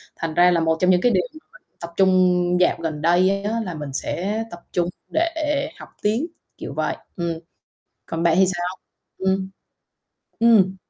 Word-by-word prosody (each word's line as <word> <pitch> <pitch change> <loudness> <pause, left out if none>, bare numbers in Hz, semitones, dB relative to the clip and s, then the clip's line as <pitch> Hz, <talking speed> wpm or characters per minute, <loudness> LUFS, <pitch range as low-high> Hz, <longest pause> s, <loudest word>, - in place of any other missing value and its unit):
thành 165 -1 -4
ra 175 +2 +5
là 170 - +3
một 160 0 +2
trong 180 - +3
những 180 - +3
cái 245 - +4
điều 185 -4 +2
mà 315 - -11
mình - - -22
tập 170 0 -7
trung 180 -2 +4
dạo 180 - +3
gần 155 -2 -3
đây 185 +4 +3
á 225 +3 -1
là 180 - -4
mình 150 -3 -6
sẽ 205 +10 -2
tập 175 - -8
trung 175 -1 0 0.2
để 330 +2 +2 0.5
học - - -11
tiếng, 220 +8 +1 0.3
kiểu - - -6
vậy. - - -1 0.2
Ừm, 170 -2 -2 0.7
còn 165 0 -3
bạn 170 -1 +3
thì 190 - +6
sao? 180 0 -2 0.4
Ừm, 190 0 0 0.9
ừm. 210 -5 +5
180 Hz, 180 wpm, -22 LUFS, 170-195 Hz, 0.9 s, thì